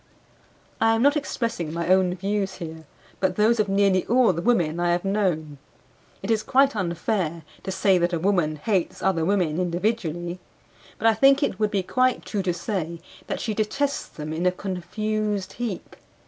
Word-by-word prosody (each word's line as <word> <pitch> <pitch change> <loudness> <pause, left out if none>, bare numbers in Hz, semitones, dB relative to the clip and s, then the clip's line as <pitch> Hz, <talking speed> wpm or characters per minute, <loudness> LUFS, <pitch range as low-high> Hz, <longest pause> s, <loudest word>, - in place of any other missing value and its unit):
I 225 0 +4
am 225 - +1
not 285 +2 +5
expressing 230 - -2
my 170 +1 -3
own 185 -1 +3
views 195 +1 -2
here, 160 -3 -8 0.3
but 185 -1 +1
those 220 +3 +3
of 210 -2 +1
nearly 195 -2 +3
all 240 -4 +4
the 170 - -3
women 175 -8 +1
I 175 0 +2
have 175 +2 -1
known. 170 -8 -1 0.6
It 200 - -1
is 220 -1 +2
quite 270 +2 +3
unfair 170 -2 -2 0.2
to 190 - -4
say 190 -1 +3
that 175 +1 +1
a 170 - 0
woman 175 -3 +1
hates 185 +3 -1
other 180 -3 +2
women 175 -3 +1
individually; 175 -1 -2 0.6
but - - -5
I 225 - +6
think 275 +6 +5
it 195 - -1
would 215 -1 +2
be 200 -3 0
quite 255 +5 +1
true 205 - -2
to 185 -1 0
say 175 -2 -3 0.3
that - - -3
she 220 - -2
detests 275 +7 -1
them 155 0 -7
in 170 +3 0
a - - +4
confused 205 +2 -3
heap. 230 -7 -5
190 Hz, 180 wpm, -24 LUFS, 175-215 Hz, 0.6 s, I